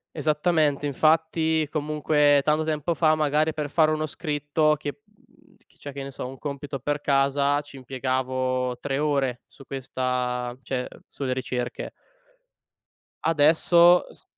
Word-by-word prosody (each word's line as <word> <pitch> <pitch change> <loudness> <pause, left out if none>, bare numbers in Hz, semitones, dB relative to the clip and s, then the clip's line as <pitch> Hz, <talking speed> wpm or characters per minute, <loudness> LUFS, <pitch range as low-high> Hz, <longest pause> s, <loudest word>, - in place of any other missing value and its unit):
Esattamente, 150 -2 +1
infatti 160 +2 +2
comunque 150 -1 +2
tanto 155 +2 +1
tempo 155 +1 -1
fa 155 -1 +3
magari 155 +1 +1
per 150 -1 -4
fare 155 +1 +3
uno 155 0 -1
scritto 150 0 0
che 145 +8 -7
mhmm, 210 -1 -28
chi - - -30
c'è 145 - -9
che 140 0 -6
ne 135 - -7
so 130 - -6
un 135 +1 -9
compito 140 -1 -5
per 145 +3 -2
casa, 140 0 +2
ci 145 -1 -14
impiegavo 130 -1 -2
3 135 -1 -2
ore 140 -4 0
su 135 - -16
questa 125 -2 -2
cioè 125 -2 -3 0.2
sulle 135 -2 -4
ricerche. 125 -1 -3 1.3
Adesso 165 +3 +5
s - - -11
145 Hz, 140 wpm, -25 LUFS, 135-155 Hz, 1.3 s, Adesso